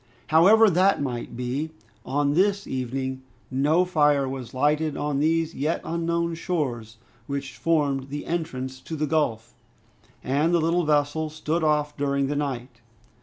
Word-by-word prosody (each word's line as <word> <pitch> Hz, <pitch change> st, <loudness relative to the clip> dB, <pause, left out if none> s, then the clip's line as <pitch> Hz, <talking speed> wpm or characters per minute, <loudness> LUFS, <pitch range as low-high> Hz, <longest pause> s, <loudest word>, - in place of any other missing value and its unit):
However 200 Hz, +8 st, +6 dB
that 190 Hz, +1 st, +3 dB
might 120 Hz, -4 st, -4 dB
be, 130 Hz, +5 st, -2 dB, 0.3 s
on 145 Hz, +2 st, 0 dB
this 200 Hz, +4 st, +2 dB
evening 130 Hz, +1 st, -3 dB, 0.3 s
no 150 Hz, +7 st, +3 dB
fire 150 Hz, -5 st, +3 dB
was 130 Hz, -2 st, -6 dB
lighted 150 Hz, +3 st, +1 dB
on 145 Hz, -1 st, -1 dB
these 165 Hz, +2 st, +1 dB
yet 150 Hz, +4 st, -1 dB
unknown 170 Hz, 0 st, -1 dB
shores, 130 Hz, -, -3 dB, 0.3 s
which 140 Hz, -3 st, -4 dB
formed 140 Hz, -5 st, 0 dB
the 145 Hz, +1 st, -5 dB
entrance 130 Hz, -6 st, -3 dB
to 160 Hz, -, -6 dB
the 155 Hz, 0 st, -1 dB
gulf, 145 Hz, -8 st, -1 dB, 0.7 s
and 150 Hz, +6 st, +2 dB
the -, -, +3 dB
little 165 Hz, +2 st, +1 dB
vessel 150 Hz, +1 st, +1 dB
stood 155 Hz, +2 st, -2 dB
off 150 Hz, -1 st, +1 dB
during 140 Hz, -1 st, 0 dB
the 145 Hz, +2 st, -2 dB
night. 125 Hz, -4 st, -4 dB
150 Hz, 145 wpm, -25 LUFS, 135-165 Hz, 0.7 s, However